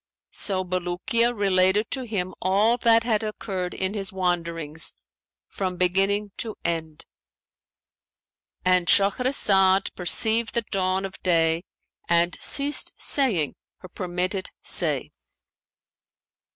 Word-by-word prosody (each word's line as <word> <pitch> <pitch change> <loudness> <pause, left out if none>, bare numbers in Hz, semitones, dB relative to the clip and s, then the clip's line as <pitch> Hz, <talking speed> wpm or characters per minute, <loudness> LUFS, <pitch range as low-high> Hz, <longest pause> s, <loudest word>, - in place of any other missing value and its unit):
So 190 -2 0
Bulukiya 185 +6 0
related 195 +1 +2
to 265 - -2
him 185 -4 -3
all 205 +5 +3
that 230 -1 +3
had 225 -2 0
occurred 195 -4 -4
in 190 +1 -2
his 195 -3 -3
wanderings 170 -4 -1 0.5
from 185 -2 -4
beginning 195 +3 +1
to 220 -2 -4
end."—And 170 +2 -6
Shahrazad 195 -3 +3
perceived 220 +6 +2
the 235 - 0
dawn 190 0 0
of 195 - -9
day 165 -1 +1 0.4
and 170 +1 +3
ceased 285 +1 +1
saying 210 - +2 0.2
her 185 - -13
permitted 185 +1 -3
say. - - +2
190 Hz, 100 wpm, -24 LUFS, 180-210 Hz, 0.5 s, all